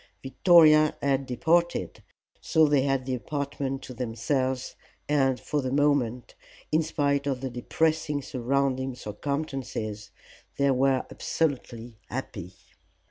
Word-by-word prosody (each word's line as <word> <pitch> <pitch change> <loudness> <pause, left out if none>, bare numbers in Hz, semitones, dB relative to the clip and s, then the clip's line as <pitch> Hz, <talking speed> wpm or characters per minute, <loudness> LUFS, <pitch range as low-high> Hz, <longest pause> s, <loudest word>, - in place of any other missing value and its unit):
Victoria 155 +1 +5
had 135 -1 +1
departed, 170 +7 0 0.4
so 160 0 +3
they 145 -2 +3
had 135 -1 0
the 130 - -2
apartment 140 0 -3
to 130 - -8
themselves, 130 +2 -2 0.3
and 135 -3 +2
for 150 - -2
the 130 - -2
moment, 135 -4 +1 0.4
in 155 +1 +3
spite 145 -2 0
of 130 -3 -1
the 130 -1 -4
depressing 155 +4 0
surrounding 130 +1 -1
circumstances, 115 -3 -4 0.5
they 140 0 +3
were 130 0 +2
absolutely 120 -7 -3
happy. 100 -8 -6
135 Hz, 115 wpm, -27 LUFS, 125-145 Hz, 0.5 s, Victoria